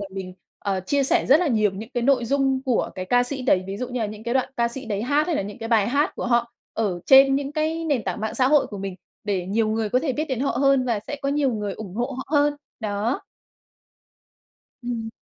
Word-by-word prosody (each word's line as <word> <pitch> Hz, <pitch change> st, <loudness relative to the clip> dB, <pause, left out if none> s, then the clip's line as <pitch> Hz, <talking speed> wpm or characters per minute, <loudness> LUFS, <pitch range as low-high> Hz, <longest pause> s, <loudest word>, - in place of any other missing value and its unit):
là 200 Hz, -, -4 dB
mình, 190 Hz, -1 st, -7 dB, 0.2 s
ờ, 195 Hz, -2 st, -2 dB
chia 280 Hz, +10 st, 0 dB
sẻ -, -, +2 dB
rất 285 Hz, +5 st, +6 dB
là 355 Hz, -, +1 dB
nhiều 215 Hz, -5 st, +2 dB
những 200 Hz, +4 st, -8 dB
cái 240 Hz, -, 0 dB
nội 255 Hz, -1 st, +3 dB
dung 270 Hz, +1 st, +1 dB
của 255 Hz, -4 st, 0 dB
cái 185 Hz, -, -4 dB
ca 245 Hz, +6 st, +3 dB
sĩ 265 Hz, +1 st, -4 dB
đấy. 190 Hz, -7 st, +2 dB
Ví 195 Hz, +1 st, -5 dB
dụ 250 Hz, +3 st, -4 dB
như 250 Hz, -1 st, -3 dB
là 220 Hz, -, 0 dB
những 210 Hz, +1 st, -8 dB
cái 235 Hz, +2 st, -2 dB
đoạn 265 Hz, -, +1 dB
ca 235 Hz, 0 st, +2 dB
sĩ 260 Hz, +3 st, -7 dB
đấy 205 Hz, -2 st, -2 dB
hát, 285 Hz, +5 st, +2 dB
hay 340 Hz, -3 st, 0 dB
là -, -, 0 dB
những 205 Hz, +4 st, -8 dB
cái 225 Hz, -1 st, -5 dB
bài 220 Hz, -3 st, +3 dB
hát 285 Hz, +4 st, +1 dB
của -, -, -4 dB
họ 235 Hz, -1 st, +1 dB, 0.2 s
ở 200 Hz, -6 st, -1 dB
trên 270 Hz, 0 st, +7 dB
những 280 Hz, +1 st, -2 dB
cái 315 Hz, +2 st, -1 dB
nền 285 Hz, -7 st, 0 dB
tảng 185 Hz, +2 st, -3 dB
mạng 220 Hz, 0 st, -3 dB
xã 255 Hz, -1 st, +3 dB
hội 295 Hz, 0 st, +4 dB
của 205 Hz, -, -8 dB
mình 195 Hz, -1 st, -4 dB, 0.3 s
để 190 Hz, -4 st, -1 dB
nhiều 215 Hz, +3 st, +1 dB
người 220 Hz, 0 st, 0 dB
có 250 Hz, -, +2 dB
thể 270 Hz, 0 st, -1 dB
biết 300 Hz, +4 st, -1 dB
đến 260 Hz, -6 st, -3 dB
họ 275 Hz, -, +1 dB
hơn 275 Hz, -2 st, +3 dB
và 235 Hz, -4 st, 0 dB
sẽ 290 Hz, -, -4 dB
có 275 Hz, -, 0 dB
nhiều 280 Hz, -2 st, +1 dB
người 210 Hz, -2 st, -3 dB
ủng 190 Hz, -2 st, -8 dB
hộ 245 Hz, +5 st, -2 dB
họ 260 Hz, -, -5 dB
hơn, 290 Hz, 0 st, +3 dB, 0.3 s
đó. 215 Hz, +4 st, -1 dB, 1.6 s
Ừm. 235 Hz, -2 st, -3 dB
240 Hz, 265 wpm, -23 LUFS, 210-275 Hz, 1.6 s, trên